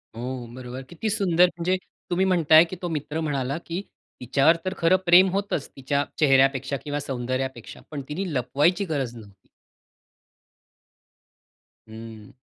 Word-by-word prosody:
हो, 125 +1 -5
बरोबर. 125 0 -7
किती 175 +6 -3
सुंदर 180 -4 +3
म्हणजे 180 +2 0 0.3
तुम्ही 185 +2 +1
म्हणताय, 165 -4 +6
की 175 +2 -6
तो 180 - -2
मित्र 155 0 -3
म्हणाला 140 -2 -2
की 170 +3 -4 0.4
तिच्यावर 135 +6 +3
तर 185 - -1
खरं 165 +2 +4
प्रेम 180 +2 +7
होतच, 195 -5 -2
तिच्या 140 +1 -1 0.2
चेहऱ्यापेक्षा 135 -1 +3
किंवा 145 -1 -3
सौंदर्यापेक्षा, 130 -2 -4
पण 145 -2 -4
तिने 175 +2 -3
लपवायची 145 - +1
गरज 130 -5 -2
नव्हती. 100 -4 -15 2.4
हं. 110 -1 -11
145 Hz, 130 wpm, -24 LUFS, 130-175 Hz, 2.4 s, प्रेम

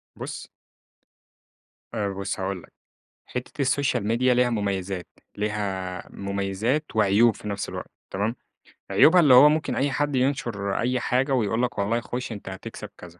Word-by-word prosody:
بُص - - -7 1.4
آآ 105 -3 -1
بُص 100 0 -4
هاقول 95 -1 -3
لك، - - -18 0.5
حتّة 125 +4 -5
السوشيال 130 -4 +1
ميديا 125 +3 +3
ليها 125 0 +3
مميزات، 100 -4 -2 0.3
ليها 100 -3 -3
مميزات 100 +8 -1
وعيوب 110 +2 +4
في - - -9
نفس 100 -1 -3
الوقت - - -7 0.2
تمام؟ 105 +5 -1 0.6
عيوبها 180 +3 +7
اللي 145 -5 +6
هو 135 +4 +9
ممكن 155 +1 0
أي 140 +1 +1
حد 145 0 0
ينشُر 120 -7 0
أي 125 +2 +1
حاجة 130 +3 +1
ويقول 115 -1 +1
لك 125 - -2
والله 105 +4 +1
خُش 125 +1 -5
أنت 100 -3 -7
هتكسب 95 0 -8
كذا. 85 0 -13
110 Hz, 150 wpm, -25 LUFS, 100-125 Hz, 1.4 s, هو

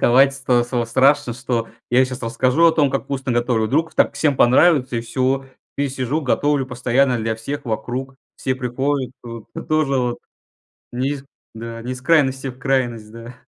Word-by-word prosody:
рисковать 135 +3 +5
стал 125 -3 +1
стало 120 -1 -1
страшно, 130 +1 +3
что 120 -2 -2 0.2
я 125 +2 +5
щас 130 0 -6
расскажу 130 +7 +2
о 165 - +5
том, 145 -4 +2
как 135 - -2
вкусно 135 -1 -3
готовлю, 120 -2 +1
вдруг 160 +7 0
так - - +2
всем 145 -4 +1
понравится, 130 0 +4
и - - 0
всё. 130 +3 -1 0.3
И 140 0 0
сижу, 130 +3 -2
готовлю 145 0 +1
постоянно 125 +1 +1
для 110 0 -1
всех 140 +6 -6
вокруг, 125 +3 -4 0.2
все 130 - -1
приходят. 130 +1 -2
То 115 -2 -9 0.2
тоже 155 -4 +1
вот, 120 -1 -1 0.7
не 130 +3 -1
из 140 -1 -5 0.3
да, 115 0 -7
не 125 +2 -5
из 125 - -10
крайности 135 -3 +2
в 130 0 -7
крайность, 120 -5 -1
да. 115 +2 -10
130 Hz, 180 wpm, -20 LUFS, 120-135 Hz, 0.7 s, рисковать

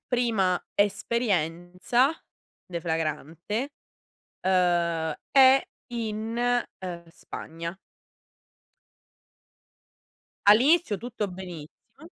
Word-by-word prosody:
prima 220 -8 +1
esperienza 200 - +1 0.6
deflagrante, 170 - -3 0.7
uhm, 170 -4 +2 0.2
è 265 0 +7 0.3
in, 230 +2 -1 0.2
uhm, 175 -2 -6
Spagna. 165 +1 -7 2.7
All'inizio 250 - +5
tutto 235 -3 -4
benissimo. 180 - -11
190 Hz, 55 wpm, -27 LUFS, 170-240 Hz, 2.7 s, è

